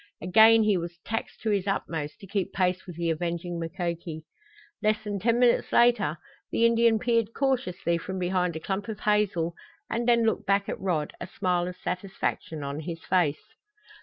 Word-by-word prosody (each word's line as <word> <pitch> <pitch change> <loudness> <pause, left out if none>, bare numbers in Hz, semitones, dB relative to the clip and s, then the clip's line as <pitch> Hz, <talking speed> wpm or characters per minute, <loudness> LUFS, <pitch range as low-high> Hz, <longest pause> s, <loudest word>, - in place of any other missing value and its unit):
Again 220 +6 +6
he 210 -3 +3
was 170 0 -5
taxed 225 0 -4
to 220 - 0
his 200 -1 0
utmost 160 -6 -3
to - - -9
keep 195 -1 -2
pace 185 0 0
with 175 - -8
the 170 -1 0
avenging 170 +1 -3
Mukoki. 170 -2 -4 0.6
Less 215 0 +1
than 205 -2 -3
ten 230 +4 +2
minutes 245 -1 +3
later 230 -10 +4 0.3
the 230 - +3
Indian 230 -1 +4
peered 230 -1 0
cautiously 185 -11 0
from 190 +3 -5
behind 180 -1 0
a - - -3
clump 195 +4 -3
of 220 -3 -6
hazel, 200 -6 +1 0.4
and 235 +1 -1
then 235 -1 +4
looked 220 - 0
back 200 0 +2
at - - -4
Rod, 170 -6 -1
a - - -4
smile 180 -2 0
of 180 - -5
satisfaction 185 -4 -3
on 140 +1 -4
his 165 +1 -6
face. 180 +4 0
190 Hz, 180 wpm, -27 LUFS, 170-220 Hz, 0.6 s, Again